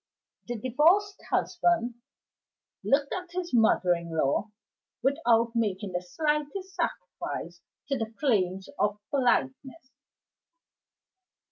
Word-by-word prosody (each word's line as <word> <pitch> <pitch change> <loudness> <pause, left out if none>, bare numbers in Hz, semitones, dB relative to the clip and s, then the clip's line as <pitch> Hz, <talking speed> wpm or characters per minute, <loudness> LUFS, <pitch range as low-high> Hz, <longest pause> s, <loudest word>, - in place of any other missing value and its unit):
The 240 -1 -3
divorced 325 - +3
husband 330 -9 +1 0.9
looked 280 0 +2
at 360 -1 -5
his 350 -4 -6
mother 220 -6 +4
in 170 -1 -5
law 155 +9 +1 0.5
without 240 -5 +3
making 205 -3 -1
the 180 0 -2
slightest 300 - -2
sacrifice 180 - -4 0.3
to 275 -2 0
the 225 -1 -3
claims 190 -8 +1
of 205 0 +1
politeness. 265 +1 0
245 Hz, 100 wpm, -28 LUFS, 195-300 Hz, 0.9 s, mother